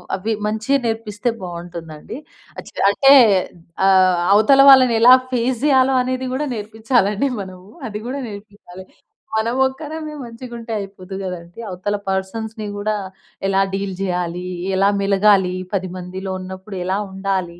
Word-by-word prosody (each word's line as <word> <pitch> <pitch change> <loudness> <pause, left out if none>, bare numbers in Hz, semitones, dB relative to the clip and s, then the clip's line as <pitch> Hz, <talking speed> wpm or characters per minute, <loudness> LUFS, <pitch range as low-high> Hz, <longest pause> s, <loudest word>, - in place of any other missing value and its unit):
అవి 210 +4 -2
మంచిగా 220 +6 0
నేర్పిస్తే 225 0 -2
బావుంటుందండి. 170 0 -8 0.4
అచి - - -11 0.2
అంటే, 270 +7 +6 0.7
ఆహ్, 185 -2 +4
అవతల 220 +7 +6
వాళ్ళని 255 -3 +7
ఎలా 245 +2 +9 0.2
ఫేస్ 245 0 0
జెయ్యాలో 265 -2 +4
అనేది 255 +1 -3
గూడా 295 +3 -2
నేర్పిచ్చాలండి 220 +2 0
మనము. 185 0 -11 0.2
అది 210 -1 -5
గూడా 275 +2 -4
నేర్పియ్యాలి. 200 -3 -12 0.5
మనమొక్కరమే 265 +7 -1
మంచిగుంటే 235 0 -9
అయిపోదు 195 -1 -9
గదండీ, 180 0 -7
అవతల 185 +3 -3
పర్సన్స్‌ని 215 +3 -3
గూడా 205 +1 -1 0.5
ఎలా 195 0 +2
డీల్ 195 0 -3
జెయాలి, 180 -1 -2 0.3
ఎలా 195 +1 +3
మెలగాలి, 195 -2 +3 0.2
10 190 -1 -1
మందిలో 185 +1 -6
ఉన్నప్పుడు 190 +2 -8
ఎలా 190 +2 -1
ఉండాలి, 190 -3 -3
205 Hz, 125 wpm, -19 LUFS, 185-235 Hz, 0.7 s, ఎలా